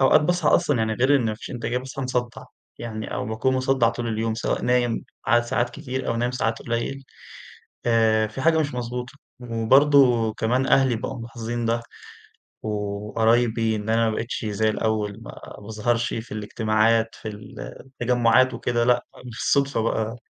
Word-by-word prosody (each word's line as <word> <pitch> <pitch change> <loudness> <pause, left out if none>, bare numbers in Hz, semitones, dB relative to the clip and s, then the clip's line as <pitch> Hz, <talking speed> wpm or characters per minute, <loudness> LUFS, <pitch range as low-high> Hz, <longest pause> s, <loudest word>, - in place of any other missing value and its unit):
أوقات 135 +3 +6
باصحى 175 +1 +1
أصلًا 145 -5 +3
يعني 110 0 0
غير 130 +5 +4
إن 130 - 0
ما 110 - -1
فيش 105 - -9
إنتاجية، 120 0 -2
باصحى 135 +1 -6
مصدع 125 -2 -2 0.4
يعني 110 -2 -5
أو - - -3
باكون 110 +4 0
مصدع 130 -2 +2
طول 115 +1 -3
اليوم، 110 0 -1
سواء 115 - -2
نايم 120 -2 +1 0.2
عدد 120 0 +4
ساعات 120 0 0
كتير 130 +2 -5
أو - - 0
نايم 120 +1 0
ساعات 115 -3 -1
قليل 120 +3 -3 0.8
آآ 110 -2 +3
في 110 +5 -7
حاجة 160 +1 +4
مش 150 -3 -1
مضبوطة، 125 0 -4 0.3
وبرضه 125 0 +4
كمان 125 +5 0
أهلي 130 -3 +4
بقوا 120 +3 -5
ملاحظين 115 0 -4
ده 115 +1 0 0.8
وقرايبي 110 +2 0
إن 105 0 -5
أنا 115 0 +3
ما 110 - -2
بقتش 115 0 -4
زي 110 +1 +1
الأول، 110 -1 -1
ما - - -10 0.2
باظهرش 110 +3 -1
في 115 +1 -6
الاجتماعات 110 +1 +1
في - - -9
ال 105 -1 -9 0.3
التجمعات 125 -1 +2
وكده، 120 0 0
لأ 125 0 +2 0.2
بالصدفة 135 +2 0
بقى 110 0 -1
115 Hz, 165 wpm, -24 LUFS, 110-125 Hz, 0.8 s, أوقات